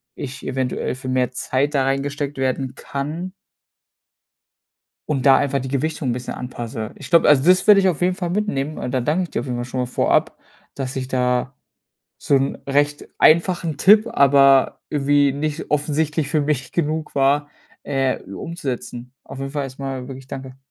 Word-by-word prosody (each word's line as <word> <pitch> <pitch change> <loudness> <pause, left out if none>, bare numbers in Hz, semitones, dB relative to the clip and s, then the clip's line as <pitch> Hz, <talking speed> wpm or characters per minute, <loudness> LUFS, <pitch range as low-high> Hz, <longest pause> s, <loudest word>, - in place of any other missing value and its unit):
ich 140 0 -7
eventuell 130 -1 -2
für 130 0 -9
mehr 130 -1 0
Zeit 135 +3 -1
da 135 - +3
reingesteckt 140 +1 -2
werden 130 0 -1
kann 155 +9 -5 1.8
und 140 -3 -1
da 135 -1 +7
einfach 140 -1 0
die 130 - -5
Gewichtung 140 +1 -2
'n - - +2
bisschen 125 +1 -5
anpasse. 120 -3 -6
Ich 135 -2 -10
glaube 170 - +5
also, 140 -3 +5
das 185 0 +5
würde 210 -2 +8
ich 190 - +3
auf 170 -3 -3
jeden 180 +1 +2
Fall 175 -2 -3
mitnehmen, 155 -8 -2
und 125 - -4
dann 125 -2 -1
danke 170 +5 +1
ich 175 - -7
dir - - -2
auf - - -7
jeden 125 -2 -3
Fall 120 - -3
schon 130 +1 -3
mal 125 - -1
vorab, 125 - +1 0.4
dass 135 -1 -5
ich 130 -1 -3
da 125 0 0 0.6
so 140 - +1
'n 135 +1 0
recht 145 +1 0
einfachen 170 -1 +3
Tipp, 210 +7 +6
aber 140 -1 +5
irgendwie 145 -1 +2
nicht 150 +3 -4
offensichtlich 150 0 0
für 155 0 +1
mich 140 -3 -1
genug 155 -1 -2
war, 140 +2 +2 0.3
äh, 135 -2 -1
umzusetzen. 125 - -6
Auf 135 - -10
jeden 135 0 -4
Fall 145 0 -2
erstmal 135 -1 -6
wirklich 135 0 -10
danke. 130 -1 -8
140 Hz, 180 wpm, -21 LUFS, 130-150 Hz, 1.8 s, würde